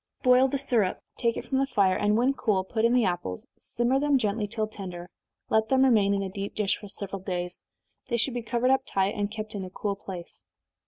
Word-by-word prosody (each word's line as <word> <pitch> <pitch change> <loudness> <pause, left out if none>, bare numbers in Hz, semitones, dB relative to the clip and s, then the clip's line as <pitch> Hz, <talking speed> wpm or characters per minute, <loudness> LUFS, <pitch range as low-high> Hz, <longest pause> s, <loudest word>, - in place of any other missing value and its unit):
Boil 255 +1 +6
the 280 - -1
syrup, 235 -8 +1 0.2
take 235 -2 0
it - - -5
from 265 - 0
the 275 - +1
fire, 195 -7 +3
and 210 +2 +2
when 255 +4 +3
cool, 205 -8 +1
put 220 +4 0
in 235 - +4
the 245 -3 +4
apples, 175 - -3
simmer 240 +3 0
them 290 -1 +3
gently 210 -2 -1
till 215 +1 -2
tender, 180 -4 -8 0.4
let 220 0 +3
them 265 0 +4
remain 210 -6 +4
in 195 - -1
a - - -2
deep 200 +1 -5
dish 210 -2 +1
for 205 - -10
several 195 -1 -6
days 180 -2 -3 0.5
they 235 - +1
should 245 +2 +2
be 245 - -2
covered 240 +3 +1
up 265 - +4
tight, 195 -4 0
and 205 -2 -1
kept 215 0 -6
in 200 -2 -4
a 185 - -6
cool 200 +2 -3
place. 185 -3 -9
215 Hz, 230 wpm, -27 LUFS, 195-245 Hz, 0.5 s, Boil